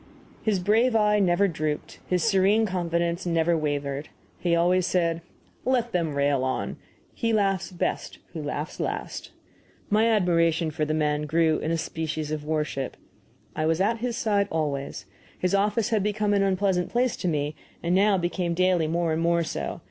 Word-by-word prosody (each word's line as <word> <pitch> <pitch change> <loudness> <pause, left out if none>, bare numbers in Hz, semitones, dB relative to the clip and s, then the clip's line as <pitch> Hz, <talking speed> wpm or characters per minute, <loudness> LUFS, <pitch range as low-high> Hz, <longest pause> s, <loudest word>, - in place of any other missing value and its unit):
His 215 -3 +1
brave 220 +6 +2
eye 210 -1 +4
never 195 +1 +3
drooped, 155 -3 -3
his 180 -1 +1
serene 205 +1 +3
confidence 170 -2 -1
never 165 0 +2
wavered. 145 -2 -2 0.3
He 170 -1 +2
always 180 +2 +3
said: 170 -2 +1 0.4
"Let 245 -2 +1
them 165 -6 -1
rail 140 -2 +2
on; 130 0 -2 0.4
he 230 -1 -1
laughs 195 -3 +1
best 175 - -3 0.2
who 160 - -4
laughs 145 +1 -4
last." - - -4 0.6
My 215 +2 +4
admiration 170 -6 +2
for 155 0 -1
the 155 +1 -1
man 150 -1 0
grew 160 0 +2
into 165 +2 -1
a - - -1
species 160 -1 -3
of 155 -1 -3
worship. 150 -3 -2 0.6
I 155 - 0
was 165 +1 +1
at 220 +4 +1
his 240 0 -2
side 205 -3 +1
always. 140 -9 -2 0.3
His 180 +1 -1
office 210 +2 +2
had 220 -3 +2
become 210 +1 0
an 200 - +3
unpleasant 190 -2 +1
place 245 0 +1
to 180 - -3
me, 150 -2 -1 0.3
and 170 +1 +1
now 200 +1 +4
became 175 -1 -1
daily 180 -2 +2
more 165 0 0
and 160 - -1
more 170 0 +2
so. - - -4
175 Hz, 170 wpm, -26 LUFS, 155-200 Hz, 0.6 s, eye